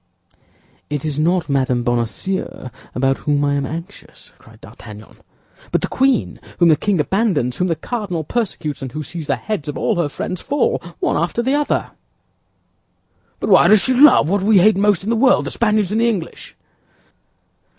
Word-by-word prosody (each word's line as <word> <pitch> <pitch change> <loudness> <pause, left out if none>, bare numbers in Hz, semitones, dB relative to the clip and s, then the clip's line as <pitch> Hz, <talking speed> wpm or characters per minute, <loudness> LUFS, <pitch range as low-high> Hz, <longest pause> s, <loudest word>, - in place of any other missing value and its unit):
"It 145 0 -3
is 150 -1 -2
not 175 +2 +1
Madame 130 -4 0
Bonacieux 120 - -3 0.2
about 135 +1 +1
whom 145 -1 0
I 145 - +1
am 140 -1 -1
anxious," 170 +5 -10
cried - - -19
D'Artagnan, 105 0 -13 0.5
"but - - +1
the - - -2
queen, 265 -2 0 0.2
whom 170 -2 +4
the 155 - +6
king 195 +3 -1
abandons, 155 - 0
whom 180 - 0
the 165 - 0
cardinal 195 -6 -4
persecutes, 155 -7 -3
and 130 -2 -6
who 155 - -4
sees 160 +1 -7
the - - +1
heads 210 -10 -5
of 145 - -5
all 220 - 0
her 170 -4 0
friends 180 +4 -5
fall, 285 -1 0 0.2
one - - 0
after 175 +8 -1
the 260 +3 0
other." 295 0 -1 1.5
"Why - - +5
does 215 -2 +6
she 260 - +1
love 255 - +6
what 195 +3 0
we 205 +1 +4
hate 205 +3 +5
most 200 -2 +2
in 215 - -2
the - - +2
world, 255 +3 +3
the - - -4
Spaniards 215 -4 0
and 220 +2 +1
the 235 - +3
English?" 190 -8 -5
175 Hz, 180 wpm, -19 LUFS, 145-215 Hz, 1.5 s, the